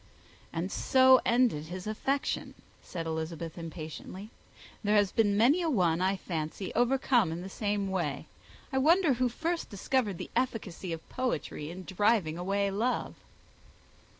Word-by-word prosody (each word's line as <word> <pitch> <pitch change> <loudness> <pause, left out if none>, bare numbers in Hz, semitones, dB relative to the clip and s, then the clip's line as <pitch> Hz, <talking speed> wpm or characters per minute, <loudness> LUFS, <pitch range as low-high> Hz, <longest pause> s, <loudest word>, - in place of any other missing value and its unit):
"And 175 +4 -3
so 260 0 +5
ended 235 -11 +3
his 180 +3 -7
affection," 270 +6 -2 0.3
said 165 -2 -6
Elizabeth, 160 0 -4
impatiently. 165 +5 -8 0.5
"There 210 0 +2
has 205 -2 +4
been 205 -3 +2
many 270 - +5
a 335 - 0
one, 180 - +2
I 190 +1 +2
fancy, 165 +1 -4
overcome 245 -5 +3
in 165 +2 -4
the 190 - -7
same 205 0 -1
way. 190 -2 -2 0.5
I 265 - +2
wonder 325 +2 +4
who 250 0 +1
first 330 +7 -2
discovered 210 -1 0
the - - -7
efficacy 200 -8 -2
of 165 -1 -6
poetry 240 - -3
in 185 +2 -7
driving 195 -3 +1
away 200 +2 0
love!" 230 +6 -1
200 Hz, 145 wpm, -30 LUFS, 175-250 Hz, 0.5 s, so